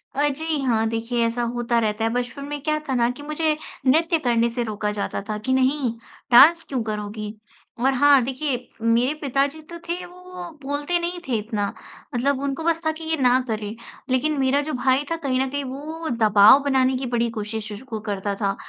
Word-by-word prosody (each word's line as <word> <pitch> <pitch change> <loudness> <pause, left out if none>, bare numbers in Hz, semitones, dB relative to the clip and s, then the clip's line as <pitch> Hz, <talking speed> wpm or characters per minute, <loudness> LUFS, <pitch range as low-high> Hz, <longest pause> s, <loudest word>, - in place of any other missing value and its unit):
अ, 290 +2 +2
जी 310 +2 -2
हाँ 225 -4 +1
देखिए, 230 +1 -1
ऐसा 230 +1 -1
होता 240 -1 0
रहता 215 -1 -1
है, 225 - +2
बचपन 245 +3 -3
में 290 0 -5
क्या 305 0 +1
था 265 - +1
ना 235 -1 +3
कि 255 +4 -10
मुझे 305 +1 0 0.3
नृत्य 325 +5 +3
करने 235 -3 +2
से 240 +1 -2
रोका 210 -2 -2
जाता 205 -1 -3
था 215 - -1
कि 260 - +1
नहीं 260 -1 +2 0.4
डांस 325 +8 +8
क्यों 260 -3 -1
करोगी? 210 0 -5 0.5
और 265 +3 +3
हाँ 280 +1 +6
देखिए, 265 +1 -2 0.2
मेरे 230 +4 +2
पिताजी 280 +2 0
तो 340 - -7
थे 355 +1 -3
वो 355 +1 -14 0.4
बोलते 290 +5 -1
नहीं 350 +1 -3
थे 245 -3 +1
इतना, 210 -1 -2 0.5
मतलब 265 +3 +1
उनको 280 +3 -2
बस 330 0 +1
था 315 - +3
कि 315 +1 -9
ये 320 0 0
ना 250 0 +5
करें। 215 -1 -3 0.3
लेकिन 285 +4 +1
मेरा 270 +2 +2
जो 305 +1 -4
भाई 260 +2 +2
था - - +2
कहीं 260 -2 +1
न 265 0 0
कहीं 285 +1 -3
वो 305 +5 -6
दबाव 215 +1 +6
बनाने 265 -2 +2
की 260 - -4
बड़ी 235 0 +1
कोशिश 215 +1 -4
श 205 - -8
वो 220 - -2
करता 205 -1 -3
था 195 -1 +1
260 Hz, 205 wpm, -23 LUFS, 230-290 Hz, 0.5 s, डांस